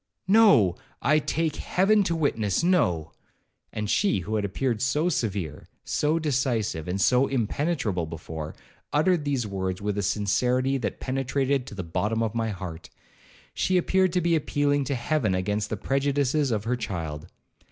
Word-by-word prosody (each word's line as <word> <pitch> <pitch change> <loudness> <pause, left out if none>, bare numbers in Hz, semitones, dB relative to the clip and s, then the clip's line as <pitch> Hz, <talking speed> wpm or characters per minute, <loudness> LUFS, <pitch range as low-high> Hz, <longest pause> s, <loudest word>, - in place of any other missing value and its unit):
'No, 190 - +5 0.2
I 150 +4 +3
take 155 +1 -1
Heaven 205 +3 +2
to 170 - 0
witness,—no;' 110 - +1 0.6
and 105 0 -3
she, 190 - +2
who 105 +5 -5
had 105 - 0
appeared 110 +3 -1
so 150 +7 +1
severe, 95 - -3 0.2
so 150 +2 +1
decisive, 125 - -1
and 90 +2 -2
so 125 +6 +4
impenetrable 120 - -1
before, 80 -1 -7 0.4
uttered 155 +1 +2
these 135 -5 0
words 95 -2 -3
with 105 0 -2
a - - +1
sincerity 125 +7 +1
that - - -3
penetrated 135 0 -1
to - - -8
the 95 - -4
bottom 105 +7 -1
of 110 -1 -2
my 115 -1 -1
heart;—she 95 - -5
appeared 185 +1 +2
to 180 - +2
be 170 0 +2
appealing 145 -2 +1
to 140 - -1
Heaven 120 -5 0
against 105 +3 -1
the 110 - -2
prejudices 140 +3 +1
of 110 -3 -1
her 120 +3 0
child. 85 -8 -5
125 Hz, 150 wpm, -26 LUFS, 100-145 Hz, 0.6 s, No